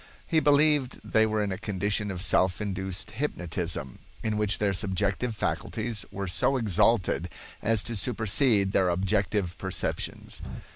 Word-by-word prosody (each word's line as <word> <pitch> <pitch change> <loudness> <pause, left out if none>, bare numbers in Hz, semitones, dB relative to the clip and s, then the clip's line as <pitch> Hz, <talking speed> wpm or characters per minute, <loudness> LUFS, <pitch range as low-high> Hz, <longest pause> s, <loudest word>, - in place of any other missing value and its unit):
He 160 - +2
believed 145 -3 +3
they 110 0 +3
were 110 -1 0
in 100 - -2
a 95 - -4
condition 105 +1 -1
of 90 -1 -2
self 95 -2 +2
induced 95 -1 -3
hypnotism, 90 - -3 0.2
in 110 -1 0
which 105 -1 +1
their 100 -2 +1
subjective 100 +4 0
faculties 110 +1 -2
were 100 0 -4
so 110 +9 +2
exalted 100 -4 +2 0.3
as 110 -1 +1
to 120 - -3
supersede 110 -1 +2
their 95 -2 +3
objective 95 0 0
perceptions. 95 -1 -3
105 Hz, 140 wpm, -27 LUFS, 95-110 Hz, 0.3 s, believed